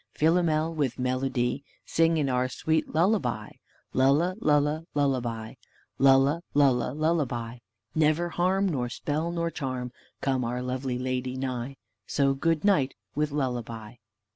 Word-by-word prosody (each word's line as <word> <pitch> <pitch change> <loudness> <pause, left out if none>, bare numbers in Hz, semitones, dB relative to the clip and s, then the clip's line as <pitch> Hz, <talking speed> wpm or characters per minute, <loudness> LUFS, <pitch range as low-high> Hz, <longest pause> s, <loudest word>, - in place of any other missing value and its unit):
Philomel, 160 0 +2
with 145 -6 -1
melody, 130 0 -1 0.2
Sing 165 0 +2
in 145 -3 +1
our 130 -1 +1
sweet 160 +3 -1
lullaby, 150 - +1 0.4
Lulla, 145 +8 +3
lulla, 150 +1 +2
lullaby; 120 -6 -1 0.5
lulla, 135 +4 +5
lulla, 135 -4 +3
lullaby; 135 -7 -1 0.3
Never 155 +2 +2
harm, 185 +3 +1
nor 130 -8 -1
spell, 155 +6 -2
nor 170 -1 -1
charm, 130 -4 -4 0.3
Come 130 -2 0
our 125 +1 -2
lovely 125 0 -2
lady 130 0 -2
nigh; 130 0 -4 0.3
So 140 -1 +2
good 165 +5 0
night 145 -10 +3 0.2
with 150 0 0
lullaby." 120 -5 -4
135 Hz, 125 wpm, -27 LUFS, 125-155 Hz, 0.5 s, lulla